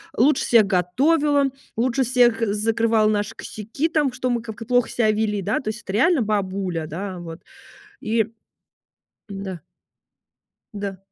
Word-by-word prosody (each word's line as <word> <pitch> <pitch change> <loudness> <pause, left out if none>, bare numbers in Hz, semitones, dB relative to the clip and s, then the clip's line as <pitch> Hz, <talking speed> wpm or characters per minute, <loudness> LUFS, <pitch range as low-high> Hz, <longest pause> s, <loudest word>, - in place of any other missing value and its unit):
лучше 265 +3 +3
всех 225 -4 +5
готовила, 280 - +2 0.3
лучше 255 +3 +1
всех 240 -2 +3
закрывала 220 0 +2
наши 205 -1 -1
косяки, 230 +10 -4
там, 295 -6 +1
что 255 0 -2
мы 240 -1 0
как-то 220 -1 -8
плохо 245 0 +2
себя 220 -3 +1
вели, 210 -1 -1
да, 200 +3 0
то 215 - -4
есть 220 +2 -5
это 190 - -7
реально 275 - +3
бабуля, 190 -5 -1
да, 185 +4 -5
вот, 165 -1 -9 0.6
и 220 0 0 1.0
М-да. 195 -3 -6 1.1
Да. 200 -2 -5
220 Hz, 140 wpm, -22 LUFS, 200-250 Hz, 1.1 s, всех